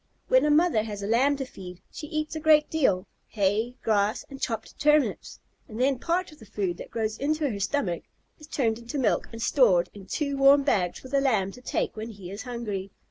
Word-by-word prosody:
When - - +5
a - - +3
mother 305 -6 +4
has 210 -2 -6
a - - -2
Lamb 265 +6 +3
to 270 - -3
feed, 180 -7 -10
she 300 - -7
eats 310 +1 -3
a - - -2
great 305 -1 +4
deal, 260 -13 +2 0.2
hay, 215 +4 0
grass, 215 +1 +1
and 270 - -9
chopped 225 -3 -4
turnips, 300 -1 +2 0.3
and 220 +1 -8
then 265 0 +2
part 350 +4 -1
of 305 - -16
the 220 - -13
food 190 -4 -2
that - - -9
goes 220 -1 -3
into 305 +2 0
her 200 - -5
stomach 195 - -1 0.4
is 305 - -13
turned 230 -7 0
into 235 +5 -6
milk 250 -6 +1
and 230 0 -6
stored 180 -10 +3
in 195 -2 -12
two 280 -2 -2
warm 275 +1 +6
bags 190 -11 +1
for 260 - -12
the 275 0 +2
Lamb 215 -8 +1
to 250 - -13
take - - -2
when 220 +1 -5
he 195 -5 -9
is 200 +2 -6
hungry. 215 -6 -4
235 Hz, 220 wpm, -27 LUFS, 205-285 Hz, 0.4 s, warm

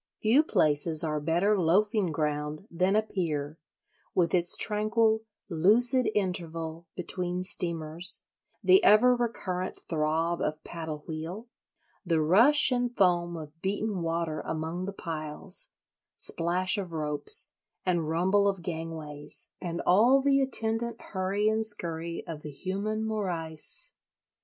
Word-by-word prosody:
Few 230 +7 +4
places 155 - +2
are 150 -1 -1
better 170 +7 +2
loafing 195 +2 +2
ground 150 +1 -2
than 185 +4 +1
a 215 - +3
pier, 155 -7 -3 0.6
with 170 -3 +2
its 175 -1 +2
tranquil 220 +1 +1 0.2
"lucid 225 +9 +4
interval" 165 -4 -3
between 180 0 -3
steamers, 170 -2 -1 0.4
the 375 +2 +6
ever 245 +4 +6
recurrent 190 -6 -3
throb 160 +2 0
of 155 0 -2
paddle 160 -3 -6
wheel, 170 +9 -6 0.5
the 170 -4 +1
rush 230 - +5
and 245 -1 -1
foam 175 -3 +2
of 155 +1 -10
beaten 200 0 -2
water 165 -1 -2
among 160 +3 -4
the 200 - -4
piles, 165 0 -6 0.5
splash 180 +4 +2
of 180 -4 -6
ropes 155 - -2 0.4
and 170 -4 0
rumble 190 +5 +2
of 195 -3 -1
gangways, 160 -3 -5
and 170 -2 -3
all 235 +9 +5
the 275 0 +3
attendant 235 -2 0
hurry 195 +2 -1
and 220 +1 +1
scurry 170 -6 0
of 160 -3 -7
the 150 - -7
human 200 +9 -3
morrice. 175 -8 -2
180 Hz, 125 wpm, -28 LUFS, 160-210 Hz, 0.6 s, the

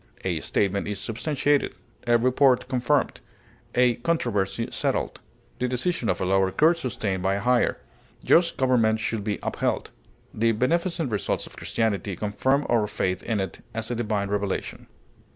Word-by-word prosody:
A - - -1
statement 100 0 0
is 105 -1 -3
substantiated; 145 +5 0 0.3
a 120 0 +5
report 130 +2 +3
confirmed; 130 +2 +1 0.6
a 125 -1 +4
controversy 115 - -1
settled; - - -2 0.4
the 125 - +1
decision 125 - -1
of 90 - 0
a - - -1
lower 95 0 +3
court 160 - +3
sustained 100 - -2
by 95 +1 +1
a - - -1
higher. 125 +4 +2 0.5
Just 170 0 +4
government 115 -4 +3
should 110 -1 -2
be 105 -1 -1
upheld. - - -1 0.4
The 115 +1 +2
beneficent 165 - 0
results 105 -4 -1
of - - -13
Christianity 105 -3 -1
confirm 130 +9 0
our 115 -3 +2
faith 95 -2 -1
in 110 -3 -1
it 95 - -5
as 115 +1 -3
a - - -1
divine 105 -4 -1
revelation. 100 -1 -3
115 Hz, 150 wpm, -25 LUFS, 100-130 Hz, 0.6 s, a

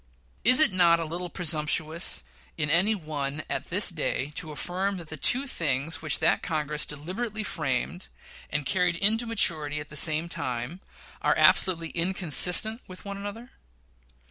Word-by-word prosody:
Is 255 +5 +7
it 310 -11 +9
not 170 -2 +4
a 165 - -3
little 175 +3 -5
presumptuous 160 - -2 0.3
in 150 -1 -1
any 190 +7 +3
one 150 -4 -5
at - - -4
this 190 +2 +3
day 150 -3 -3
to 165 0 -4
affirm 185 +6 -3
that 170 -3 -10
the 155 - -7
two 250 - +5
things 155 - -2
which 155 -1 +1
that - - +1
Congress 150 -3 -3
deliberately 195 +9 -5
framed, 155 +1 -3 0.4
and 145 -2 -3
carried 180 +3 +1
to 220 +4 +4
maturity 155 -9 0
at 150 - -9
the 150 - -10
same 155 +2 +2
time, 130 +1 -5 0.4
are - - +1
absolutely 170 -3 +3
inconsistent 180 - +1
with 185 0 -11
each 200 0 -6
other? 205 +5 -8
170 Hz, 155 wpm, -26 LUFS, 150-190 Hz, 0.4 s, it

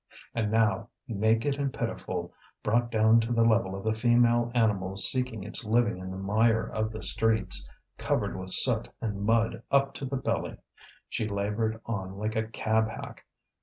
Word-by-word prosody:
And 110 -2 -1
now, 110 -3 +1 0.2
naked 115 +6 +1
and 140 -1 -1
pitiful, - - -4 0.3
brought 120 +2 +1
down 110 0 +4
to 115 +1 -2
the 115 -1 +3
level 110 -4 +2
of 95 - -7
the 110 - +1
female 120 +1 +3
animal 100 -5 +1
seeking 120 0 +3
its 105 +4 0
living 115 -2 +1
in 95 0 -7
the 95 - -6
mire 110 +4 +2
of 110 0 -2
the 110 -1 -7
streets, 110 -1 +2 0.3
covered - - -1
with 95 0 -6
soot - - +2
and 105 -3 -4
mud 115 +2 +1
up 140 0 +2
to 140 - -6
the 135 +1 -3
belly, 130 - -2 0.5
she 110 - -3
laboured 105 +2 -2
on 95 -4 -5
like 110 +2 -3
a 110 0 -1
cab 110 0 0
hack. - - -9
110 Hz, 170 wpm, -28 LUFS, 105-115 Hz, 0.5 s, down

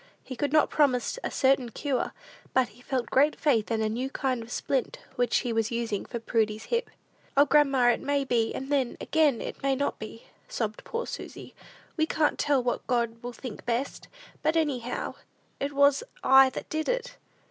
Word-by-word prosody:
He 260 - -7
could 285 +2 -1
not 310 0 +4
promise 280 - +2
a - - -1
certain 265 -2 +2
cure, 260 +2 -2 0.4
but 260 -1 +3
he 235 +4 -19
felt 250 -1 -3
great 290 +3 +3
faith 245 -9 +2
in 225 -1 0
a - - +1
new 245 +5 -2
kind 260 -3 -1
of 225 +1 -10
splint 265 0 -1 0.2
which 245 -1 +2
he 240 - -1
was 225 -1 +1
using 235 -3 -2
for 240 - -5
Prudy's 220 -2 0
hip. 470 +1 0 0.5
"O, 285 - +7
grandma, 275 -5 +4
it - - -2
may 285 0 0
be, 235 -4 +1
and 270 +2 -5
then, 265 -4 +1
again, 300 -6 +2
it - - -6
may 275 -1 +1
not 280 +2 -2
be," 220 +1 -8 0.2
sobbed 215 -2 -3
poor 465 +1 -3
Susy; - - -8 0.4
"we 315 0 +2
can't 305 -2 +1
tell 280 -3 +2
what 245 - -2
God 235 -2 0
will 245 - -5
think 240 -2 -8
best; 240 +4 -2 0.3
but 315 - +1
anyhow, 255 -6 -1 0.5
it 280 +1 -2
was 280 +4 +4 0.2
I 265 0 +7
that - - -7
did 315 0 -2
it." - - -2
260 Hz, 190 wpm, -28 LUFS, 235-285 Hz, 0.5 s, O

